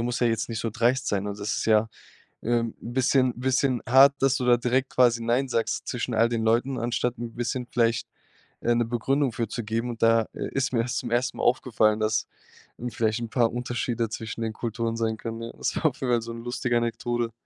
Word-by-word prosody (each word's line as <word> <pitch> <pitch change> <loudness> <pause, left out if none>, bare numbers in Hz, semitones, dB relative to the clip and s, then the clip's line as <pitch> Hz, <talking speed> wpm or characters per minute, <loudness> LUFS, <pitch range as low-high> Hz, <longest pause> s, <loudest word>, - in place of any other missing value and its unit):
Du - - 0
musst 120 +1 -2
ja 120 - +4
jetzt 115 0 0
nicht 115 -1 -3
so 115 - -2
dreist 125 +3 +1
sein 100 0 -1
und 100 0 -5
das 105 +1 -2
ist - - -2
ja, 110 0 +4 0.6
ähm, 115 -1 0
'n 120 - -7
bisschen 130 -1 +3
bisschen 130 -1 +1
hart, 135 +3 +7
dass 135 0 +3
du 125 - -2
da 120 -1 +6
direkt 130 +2 0
quasi 120 -2 +3
„nein“ 120 +4 +1
sagst 115 -1 -1
zwischen 125 0 -3
all 115 +1 +3
den 115 -2 -1
Leuten, 120 +4 +1
anstatt 120 0 -1
'n 115 -1 -6
bisschen 120 +1 -2
vielleicht, 115 -1 +1 0.6
äh, 120 - +2
'ne 120 0 +2
Begründung 125 +2 0
für 115 - -2
zu 120 - -3
geben.“ 115 +3 -2
Und 115 - -9
da, 115 0 +4
äh, - - -4
ist 135 -1 0
mir 115 -1 +2
das 120 -1 -3
zum 120 -2 -4
1. 120 +1 0
Mal - - -4
aufgefallen, 110 -3 +2
dass, 110 +1 0 0.5
hm, 120 +1 -3
vielleicht 110 0 0
'n 115 - -4
paar 120 -2 +2
Unterschiede 120 -1 -2
zwischen 110 0 -6
den 110 -1 -2
Kulturen 115 0 -3
sein 110 -1 -1
können, 115 0 -6
ja. 115 - -6
Das - - -2
war 155 - +3
auf 145 - -2
jeden 125 -2 +1
Fall 120 - +2
so 115 +1 -7
'n 115 0 -8
lustige 120 -1 0
Anekdote. 120 0 -1
120 Hz, 235 wpm, -26 LUFS, 115-125 Hz, 0.6 s, hart